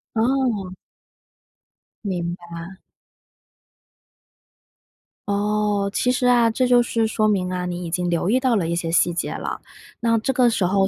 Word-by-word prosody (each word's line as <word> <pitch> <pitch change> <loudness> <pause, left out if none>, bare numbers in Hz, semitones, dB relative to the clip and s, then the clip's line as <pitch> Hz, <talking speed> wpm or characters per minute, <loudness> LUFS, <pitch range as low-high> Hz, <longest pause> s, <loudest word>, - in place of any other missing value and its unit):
哦。 225 -5 0 1.3
明 175 -3 -2
白。 175 +1 -10 2.5
哦， 205 0 0
其 250 - +1
实 250 0 0
啊， 240 -2 +5
这 255 +3 +1
就 245 -1 +5
是 230 -1 0
说 215 0 +1
明 185 -3 0
啊， 180 0 -2
你 175 0 -4
已 165 - -6
经 175 +1 -1
留 170 +1 0
意 255 - +3
到 255 -2 +2
了 180 -6 0
一 170 - -1
些 170 -1 -2
细 175 +1 +3
节 170 - -2
了。 - - -5 0.4
那 230 -1 +2
这 245 +5 -1
个 250 -1 +4
时 215 -5 0
候 195 +1 +2
205 Hz, 165 characters per minute, -22 LUFS, 180-235 Hz, 2.5 s, 啊